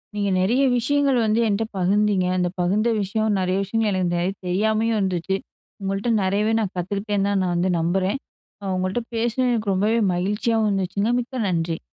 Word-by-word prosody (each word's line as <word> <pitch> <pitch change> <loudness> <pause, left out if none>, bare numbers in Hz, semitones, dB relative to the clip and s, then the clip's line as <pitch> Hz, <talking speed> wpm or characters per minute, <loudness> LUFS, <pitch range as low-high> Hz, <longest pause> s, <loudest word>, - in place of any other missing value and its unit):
நீங்க 200 -1 0
நெறய 230 +9 +2 0.2
விஷயங்கள் 275 +2 +2
வந்து 215 +1 +2
என்ட்ட 210 +1 +1
பகிர்ந்தீங்க. 195 0 +2
அந்த 180 -1 +1
பகிர்ந்த 205 +6 +2
விஷயம் 215 +1 0
நெறய 185 0 0
விஷயங்கள் 220 +2 0
எனக்கு 175 -1 0
நெறைய 180 +3 0
தெரியாமலும் 220 +4 +1
இருந்துச்சு. 190 0 -1 0.5
உங்கள்ட்ட 195 +4 -2
நெறயவே 205 +4 +1
நான் 205 -3 -2
கத்துக்கிட்டே 200 +3 -2
தான் 200 -1 +1
நான் 180 - 0
வந்து 180 +2 +1
நம்புறேன். 185 +7 0 0.4
நான் 190 -1 -2
உங்கள்ட்ட 185 +6 -1
பேசுனது 240 +2 +1
எனக்கு 215 -4 -1
ரொம்பவே 215 +5 +2 0.2
மகிழ்ச்சியாவும் 210 +4 0
இருந்துச்சுங்க, 195 +3 0
மிக்க 245 -1 -4
நன்றி. 165 -1 -1
200 Hz, 160 wpm, -23 LUFS, 185-225 Hz, 0.5 s, நெறய